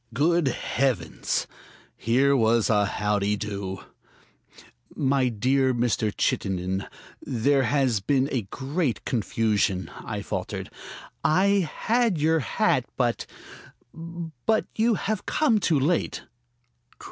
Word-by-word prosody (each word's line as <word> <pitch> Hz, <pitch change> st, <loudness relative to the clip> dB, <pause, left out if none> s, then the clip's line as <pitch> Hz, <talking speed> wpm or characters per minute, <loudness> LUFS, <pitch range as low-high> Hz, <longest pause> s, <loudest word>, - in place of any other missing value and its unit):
Good 165 Hz, +3 st, +2 dB
heavens! 120 Hz, -, -1 dB, 0.5 s
here 135 Hz, +5 st, +2 dB
was 115 Hz, -2 st, +3 dB
a 105 Hz, -2 st, +3 dB
howdy 105 Hz, -1 st, 0 dB
do. 100 Hz, -3 st, -5 dB, 1.1 s
"My 135 Hz, -2 st, +2 dB
dear 130 Hz, +3 st, +1 dB
Mr. 115 Hz, -3 st, +1 dB
Chittenden, 95 Hz, 0 st, -1 dB, 0.3 s
there 135 Hz, +3 st, +1 dB
has 130 Hz, -6 st, +2 dB
been 135 Hz, +7 st, +1 dB
a 130 Hz, -, 0 dB
great 140 Hz, -, -2 dB
confusion," 105 Hz, -4 st, 0 dB
I -, -, -6 dB
faltered. -, -, -4 dB, 0.5 s
"I 190 Hz, +1 st, +3 dB
had 230 Hz, -5 st, +1 dB
your 160 Hz, +2 st, +2 dB
hat, 125 Hz, -, +1 dB
but -, -, 0 dB, 0.7 s
but 170 Hz, -, -2 dB
you 225 Hz, +1 st, +3 dB
have 215 Hz, 0 st, -3 dB
come 275 Hz, -9 st, +2 dB
too 160 Hz, -7 st, +2 dB
late." 160 Hz, +6 st, 0 dB
130 Hz, 105 wpm, -25 LUFS, 105-160 Hz, 1.1 s, was